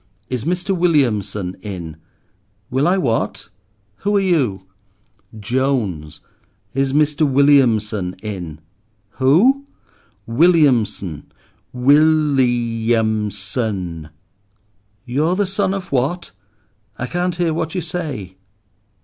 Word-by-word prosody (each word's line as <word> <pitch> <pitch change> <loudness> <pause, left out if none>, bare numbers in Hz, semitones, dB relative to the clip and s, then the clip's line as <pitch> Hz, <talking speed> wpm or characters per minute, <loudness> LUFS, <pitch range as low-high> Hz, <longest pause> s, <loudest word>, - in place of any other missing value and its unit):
"Is 125 -2 -3
Mr. 180 +3 -1
Williamson 105 - +1
in?" 90 -6 -7 0.8
"Will 135 +5 +2
I 185 +2 +3
what—who 105 - -3
are - - +4
you?" 140 - 0 0.7
"Jones! 105 - -2 0.5
Is 135 0 0
Mr. 150 +1 +1
Williamson 120 -9 +3
in?" 90 -7 -6 0.6
"Who?" 230 - +4 0.6
"Williamson. 115 - +2 0.4
Will 150 +3 +4
i 120 -2 0
am 110 -1 0
son!" 95 -5 -4 1.0
"You're 150 +8 0
the 205 +1 +1
son 195 0 -1
of 195 -2 -5
what? 140 - -1 0.7
I 130 - -3
can't 175 +4 -2
hear 170 -2 0
what 160 +1 -3
you 180 - -1
say." 145 - -5
130 Hz, 100 wpm, -19 LUFS, 105-160 Hz, 1.0 s, are